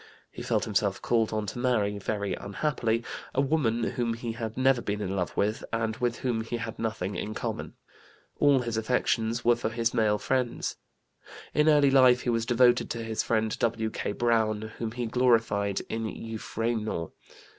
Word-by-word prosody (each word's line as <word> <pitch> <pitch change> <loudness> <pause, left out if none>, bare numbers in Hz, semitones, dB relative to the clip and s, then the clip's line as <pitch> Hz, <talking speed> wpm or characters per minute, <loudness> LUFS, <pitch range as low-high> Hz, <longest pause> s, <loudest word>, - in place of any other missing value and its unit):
He - - -8
felt - - 0
himself - - 0
called 115 -2 +1
on 110 -1 -1
to 105 +4 -5
marry, 105 -5 +1
very 100 0 -2
unhappily, 115 +1 -1 0.3
a - - +2
woman 130 -6 +1
whom 115 -1 -1
he 115 0 -4
had 115 -1 -5
never 130 -1 +3
been 105 -1 -2
in 100 -2 -2
love 90 -3 -2
with 105 +2 0
and 115 -1 -1
with 120 -1 -1
whom 120 -3 0
he 115 +1 -3
had 115 -1 -6
nothing 110 -4 -2
in 105 +2 -4
common. - - -4 0.6
All 140 -3 +5
his 115 -2 -3
affections 115 0 0
were 120 0 +6
for 115 -1 -2
his 115 +1 0
male 105 -2 +2
friends. 125 +1 -1 0.8
In 150 +1 +4
early 145 -2 +5
life 130 -2 +6
he 120 - 0
was 115 0 0
devoted 120 0 +4
to 115 -1 -3
his 110 -1 -1
friend 110 -1 0
W.K. 110 -2 -1
Browne, 110 -2 +1
whom 110 -1 -3
he 120 0 -3
glorified 115 -5 +2
in 115 0 -3
Euphranor. 110 -4 -3
115 Hz, 175 wpm, -28 LUFS, 110-120 Hz, 0.8 s, were